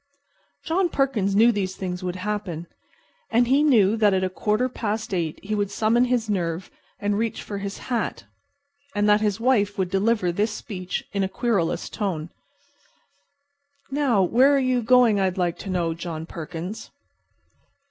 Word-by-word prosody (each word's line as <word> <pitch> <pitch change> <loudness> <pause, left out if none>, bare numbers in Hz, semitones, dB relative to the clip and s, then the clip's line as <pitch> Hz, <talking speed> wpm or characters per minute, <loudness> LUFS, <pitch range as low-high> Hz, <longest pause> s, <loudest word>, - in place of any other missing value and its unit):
John 350 +2 +1
Perkins 230 - 0
knew 230 +3 +6
these 190 -3 -2
things 180 -1 -4
would 180 -1 -3
happen. 185 -4 -4 0.6
And 240 +2 +3
he 270 +4 +4
knew 225 -9 +4
that 210 -3 +4
at 190 - +1
a 185 - -1
quarter 210 +6 0
past 220 -3 -3
eight 165 -4 -2
he 210 +2 -3
would 205 -2 0
summon 225 +4 +2
his 245 -3 0
nerve 175 -3 -2 0.3
and 205 0 0
reach 225 -1 -2
for 200 -1 -5
his 200 0 -5
hat, 240 -3 -3 0.7
and 205 0 +2
that 210 0 +4
his 210 -1 0
wife 220 -5 +2
would 185 -2 -1
deliver 195 -2 +2
this 210 +5 0
speech 190 -4 -5
in 200 - 0
a 190 - -1
querulous 200 -5 0
tone: 175 -7 -3 1.6
"Now, 270 -8 +2
where 260 +10 +4
are - - +3
you 255 -2 +1
going, 235 -3 +4
I'd 190 -1 0
like 175 -2 -1
to 195 - -7
know, 175 -3 0
John 160 -1 -6
Perkins?" 170 +5 -7
205 Hz, 165 wpm, -24 LUFS, 185-230 Hz, 1.6 s, knew